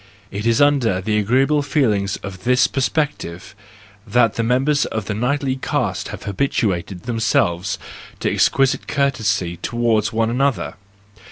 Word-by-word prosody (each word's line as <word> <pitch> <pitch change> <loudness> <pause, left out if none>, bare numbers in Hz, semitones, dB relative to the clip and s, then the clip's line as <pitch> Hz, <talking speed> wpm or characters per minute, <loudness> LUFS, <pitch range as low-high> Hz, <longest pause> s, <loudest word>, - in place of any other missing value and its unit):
It 105 +3 -3
is 115 -1 +3
under 135 -9 +3
the 105 +3 0
agreeable 135 +8 +2
feelings 110 - 0
of 95 -2 -8
this 125 +1 +4
perspective 135 - -2 0.5
that 115 +2 +3
the - - -1
members 135 +5 +2
of 110 -3 -4
the 105 - -3
knightly 130 +4 -1
caste - - -2
have - - -8
habituated 100 -5 -1
themselves 105 -5 0 0.4
to - - +1
ex¬ - - +4
quisite 135 -1 +1
courtesy 105 -11 0
toward 115 -1 0
one 115 0 0
another. 135 +1 0
115 Hz, 140 wpm, -20 LUFS, 100-135 Hz, 0.5 s, this